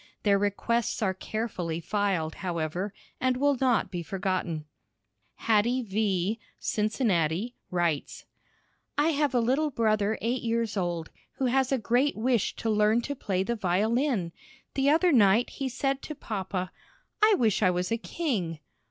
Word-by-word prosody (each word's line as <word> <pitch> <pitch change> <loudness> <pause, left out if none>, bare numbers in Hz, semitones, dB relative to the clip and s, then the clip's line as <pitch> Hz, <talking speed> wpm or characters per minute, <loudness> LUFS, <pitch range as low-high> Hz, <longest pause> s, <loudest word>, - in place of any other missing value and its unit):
Their 200 -1 +4
requests 220 +3 0
are 190 -2 +1
carefully 185 -5 -3
filed, 185 -4 -1
however, 175 +2 -2 0.3
and 255 -1 +1
will 285 +1 +3
not 250 -4 +2
be 175 -2 -3
forgotten. 180 -3 -2 0.7
Hattie 230 +3 +2
V., 205 0 0 0.2
Cincinnati, 210 - 0 0.2
writes: 170 -5 -1 0.7
I 295 +2 +3
have 290 -4 +1
a - - +5
little 265 +7 +2
brother 215 -4 +1
eight 240 +3 -1
years 230 -2 -1
old, 175 -4 -2 0.2
who 265 - -2
has 265 +1 +2
a 270 - +3
great 245 +5 +1
wish 235 -1 +1
to 225 - -3
learn 210 +2 +3
to 285 - -3
play 190 -8 -1
the 235 +4 -1
violin. 215 - +1 0.4
The 275 +1 +2
other 335 +4 +4
night 225 -2 +4
he 270 -1 -3
said 270 +2 -1
to 305 - -6
papa, 190 -6 -4 0.5
"I 430 -1 +7
wish 220 - +2
I 185 - +5
was 180 +2 -1
a 230 - +2
king." 215 - -2
215 Hz, 150 wpm, -28 LUFS, 185-250 Hz, 0.7 s, I